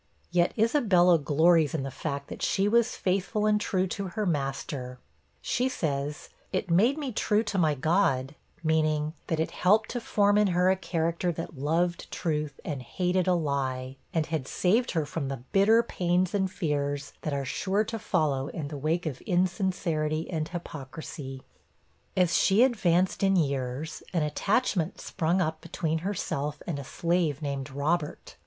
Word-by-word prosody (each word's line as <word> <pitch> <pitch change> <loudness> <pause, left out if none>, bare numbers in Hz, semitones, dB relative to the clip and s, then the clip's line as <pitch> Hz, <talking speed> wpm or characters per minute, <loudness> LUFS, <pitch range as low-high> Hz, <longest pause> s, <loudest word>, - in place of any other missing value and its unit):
Yet 175 0 +2
Isabella 205 - +4
glories 160 +1 +3
in 145 - -1
the 135 - -4
fact 140 +1 -4
that - - -8
she 195 +1 +2
was 235 +2 +3
faithful 195 +3 0
and 210 0 +3
true 185 -2 +1
to 195 +1 -3
her 205 +4 -3
master; 135 -4 -3 0.5
she 255 +2 +1
says, 150 - -3 0.2
'It 185 -2 -2
made 230 - +4
me 285 -4 -3
true 210 0 +1
to 210 -3 -1
my 155 -3 +3
God' 140 -3 +1 0.3
meaning, 155 -1 +1
that 160 - -1
it 160 - 0
helped 210 +4 +3
to 245 - -3
form 205 -2 +3
in 210 - +4
her 180 +1 +5
a - - +3
character 170 -1 -1
that 165 0 -6
loved 170 +4 0
truth, 150 -4 -2
and 145 -4 -3
hated 180 +7 0
a 180 - +4
lie, 135 -4 -2 0.2
and 160 -2 0
had 155 -5 -3
saved 220 +7 +2
her 160 -3 +1
from 145 -1 -3
the 135 -3 -5
bitter 220 +4 +5
pains 180 -2 0
and 190 -2 +1
fears 145 -4 -2
that 155 - -3
are 140 -1 -2
sure 190 +10 0
to 225 +1 -5
follow 150 -9 0
in 145 -2 -5
the 145 - -5
wake 160 +5 0
of 140 -5 -4
insincerity 175 -4 0
and 155 -2 -1
hypocrisy. 145 -5 -7 0.7
As 180 -2 +3
she 205 +5 +5
advanced 185 -8 +2
in 195 -1 +3
years, 140 -2 -1
an 170 -3 +2
attachment 185 - 0
sprung 170 +3 0
up 160 -2 -1
between 160 -1 -2
herself 150 -6 -3
and 160 -5 -3
a - - -5
slave 165 -1 0
named 140 -1 -3
Robert. 150 +3 -2
165 Hz, 165 wpm, -28 LUFS, 145-190 Hz, 0.7 s, her